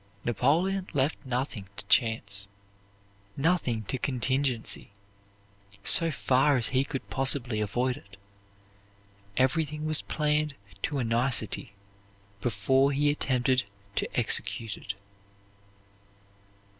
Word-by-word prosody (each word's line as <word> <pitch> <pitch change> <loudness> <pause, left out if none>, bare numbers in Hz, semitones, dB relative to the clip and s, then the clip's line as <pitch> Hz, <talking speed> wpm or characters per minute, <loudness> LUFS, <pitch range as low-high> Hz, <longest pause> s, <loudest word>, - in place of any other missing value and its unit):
Napoleon 170 - +1
left 140 0 -1
nothing 125 -6 -3
to - - -5
chance, 100 -3 +1 0.9
nothing 135 -7 +1
to 130 +5 -3
contingency, 130 -4 0 0.9
so 165 - +8
far 135 -1 +2
as 120 - 0
he 130 0 +2
could 135 -1 -6
possibly 130 -4 0
avoid 125 +5 -1
it. 100 0 -16 1.2
Everything 150 +3 0
was 155 0 0
planned 150 -1 0 0.3
to 145 - -2
a 130 - 0
nicety 115 -3 +1 0.7
before 130 +6 +2
he 145 +1 +2
attempted 130 -3 +1 0.3
to - - -1
execute 110 -3 +1
it. 100 - -6
130 Hz, 100 wpm, -28 LUFS, 115-145 Hz, 1.2 s, so